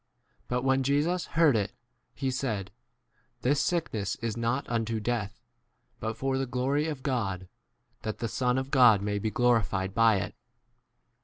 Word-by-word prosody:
But 125 +1 -1
when 135 0 +3
Jesus 150 +7 +1
heard 160 -6 +6
[itj, 105 -2 +1 0.5
he 135 -2 -1
said, 110 -7 -2 0.7
This 140 +3 +2
sickness 115 - -1
is 115 -2 -3
not 120 +4 -1
unto 115 -1 -1
death, 110 -2 -2 0.6
but 110 0 -3
for 135 +1 0
the 135 - -1
glory 135 +5 0
of 150 -4 -5
God, 100 -9 -2 0.5
that 110 -2 -4
the 115 - -2
Son 125 +2 0
of 130 - 0
5 135 - -18
God 120 -7 +6
may 105 0 -1
be 110 - -1
glorified 105 -6 +1
by 115 -1 +5
it. 95 - -2
120 Hz, 160 wpm, -28 LUFS, 110-135 Hz, 0.7 s, heard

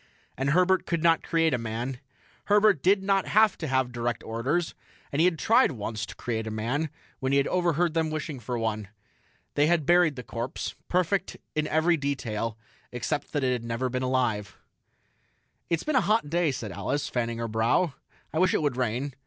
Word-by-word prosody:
And 135 +1 -1
Herbert 185 +4 +3
could 170 -2 -1
not 165 -1 +4
create 165 -2 +1
a 125 - +1
man. 115 +3 -4 0.5
Herbert 205 -6 +4
did 195 +1 +3
not 195 -1 +2
have 215 0 +4
to 160 - -3
have 130 -2 +1
direct 120 0 -2
orders, 135 +10 -1 0.4
and 140 - -1
he - - +5
had 180 -3 +2
tried 230 - +4
once 110 -1 -4
to - - -9
create 110 -2 -3
a - - -2
man 120 +9 -1 0.3
when 130 0 -1
he - - +5
had 140 - +3
overheard 175 -2 +1
them 160 -1 +1
wishing 155 -2 -4
for 120 +1 -4
one. 110 -2 -2 0.7
They 145 +1 +3
had 165 -3 +2
buried 175 -3 +4
the 125 - -7
corpse 120 +2 -4 0.2
perfect 180 +1 0 0.2
in 155 0 0
every 165 +2 +2
detail 115 -6 -2 0.3
except 135 +4 -3
that 145 -3 0
it 125 -2 +1
never 115 +2 -2
had 130 - -1
been 130 0 -1
alive. 120 -7 0 1.1
"It's 170 -1 0
been 305 - -1
a - - +5
hot 200 -6 +1
day," 170 -3 +2
said 115 -5 -5
Alice, 140 +10 -2
fanning 115 -2 -2
her 115 0 -2
brow. 115 +9 +1 0.4
"I 160 - 0
wish 185 +1 +3
it - - +1
would 140 -4 0
rain." 125 +3 -1
140 Hz, 195 wpm, -27 LUFS, 120-170 Hz, 1.1 s, he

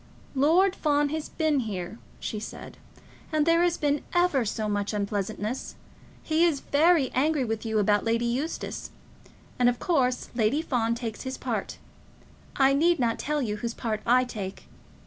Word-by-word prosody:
"Lord 335 +8 +4
Fawn 295 -1 +1
has 310 +1 -4
been 310 -3 +1
here," 205 -3 -4 0.2
she 215 - -4
said, 215 - -9 0.5
"and 305 -1 +2
there 335 +1 +4
has 350 -1 +2
been 290 -1 +1
ever 350 -8 +3
so 215 +1 -2
much 205 0 -1
unpleasantness. 205 +3 -3 0.5
He 320 +1 +2
is 325 -5 +3
very 310 -1 +3
angry 290 0 +2
with 225 0 -3
you 220 -1 0
about 205 0 +3
Lady 230 +1 +1
Eustace, 260 +7 -3 0.7
and 245 -1 +5
of 245 - -1
course 255 -7 0
Lady 240 +6 +1
Fawn 235 -6 0
takes 235 -2 -5
his 260 0 -5
part. - - -3 0.8
I 270 0 +4
need 335 +5 +3
not 235 -4 0
tell 295 -1 -1
you 210 -3 -2
whose 230 +2 -4
part 215 -2 -3
I 250 +2 +4
take. 200 -6 -6
255 Hz, 165 wpm, -27 LUFS, 220-305 Hz, 0.8 s, and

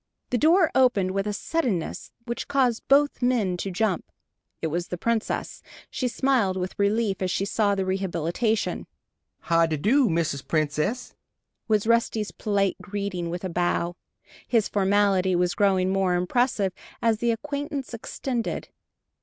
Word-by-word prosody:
The 245 - +2
door 330 - +4
opened, 220 -8 +3
with 195 +2 -1
a - - 0
suddenness 215 - -2
which 240 -1 -4
caused 260 -5 +1
both 285 +1 +3
men 235 -7 +1
to 195 - -3
jump. 190 0 -1 0.5
It - - -3
was 175 0 -1
the 180 - -4
Princess. 230 +4 -2 0.3
She 255 - -1
smiled 235 -6 +1
with 185 0 -3
relief 200 -1 +1
as 185 - 0
she 195 - 0
saw 205 0 +1
the 190 -1 -1
rehabilitation. 190 +3 -1 0.5
"How 165 0 +3
de 155 -1 -1
do, 240 - +3
Mrs. 160 -5 -1
Princess?" 155 - -1 0.5
was 215 -2 +2
Rusty's 230 -2 +1
polite 200 -2 0
greeting, 200 -4 -4
with 175 +2 -5
a 185 - -2
bow. 175 0 0 0.5
His 230 -4 +2
formality 195 -2 +2
was 175 0 +1
growing 190 -2 +2
more 190 -2 +2
impressive, 195 +1 +1 0.3
as 225 -2 +2
the 235 - +1
acquaintance 285 +2 -3
extended. 235 +1 -4
200 Hz, 145 wpm, -25 LUFS, 180-235 Hz, 0.5 s, door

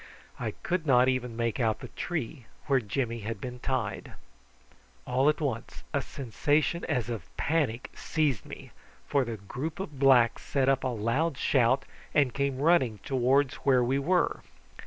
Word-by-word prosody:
I - - -2
could 175 -2 -1
not 125 -1 +5
even 125 -3 -2
make 115 -1 -1
out 110 -3 +1
the - - -8
tree 155 -7 -4 0.2
where 135 -2 +3
Jimmy 115 +1 -2
had 110 0 -5
been 125 +3 -6
tied. - - -3 0.9
All 130 +3 +3
at 150 - 0
once 130 -7 -4
a - - +2
sensation 145 +6 0
as 125 -2 -1
of 110 -6 -6
panic 140 -7 0
seized 145 - 0
me, - - -10 0.3
for 140 -2 +2
the 115 -2 -5
group 130 - -5
of 150 -8 -6
blacks 130 -4 +5
set 135 -2 0
up 135 -1 +2
a - - +1
loud 130 +7 0
shout, 130 -1 +2 0.3
and 140 -5 +3
came 140 -1 -1
running 140 -10 +3
towards 135 +1 +2
where 130 -3 +3
we 130 +3 +1
were. 175 +5 +1
130 Hz, 160 wpm, -29 LUFS, 120-145 Hz, 0.9 s, not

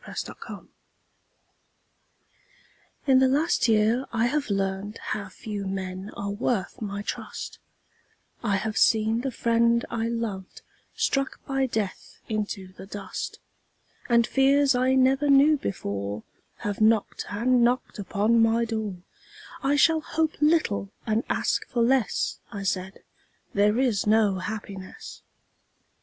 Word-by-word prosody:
Red - - -9
Maples - - -9 2.4
In 265 -2 +5
the 265 - +5
last 290 +2 +2
year 225 +3 +3
I 230 0 +1
have 285 0 0
learned 195 +1 -2
How 200 -2 -4
few 205 -1 -6
men 190 0 -4
are 200 0 -3
worth 205 -1 -2
my 200 -1 -4
trust; - - -6 0.8
I 205 -4 +1
have 215 +2 -1
seen 220 +1 +3
the 270 - -1
friend 235 -1 +2
I 230 -1 -1
loved 225 -5 -4 0.3
Struck 275 0 -1
by 270 -1 0
death 215 -5 -4
into 205 -3 -3
the 190 - -11
dust, 200 -2 -6 0.7
And 235 -1 +5
fears 275 +1 +4
I 255 +1 +2
never 265 +2 +3
knew 280 +3 +6
before 100 - -4 0.4
Have 205 0 -2
knocked 220 -1 +2
and 240 +4 +2
knocked 245 -2 0
upon 210 +3 +2
my 225 +1 +3
door 215 -5 -4 0.6
"I 275 +2 +2
shall 320 +2 +4
hope 315 0 0
little 300 -11 +2 0.2
and 220 +1 +1
ask - - 0
for 235 -2 +1
less," 250 -2 +1
I 200 -1 -5
said, 190 0 -3 0.5
"There 205 +2 +3
is 245 -6 +1
no 210 -3 +3
happiness." 200 - -7
225 Hz, 130 wpm, -26 LUFS, 200-255 Hz, 2.4 s, knew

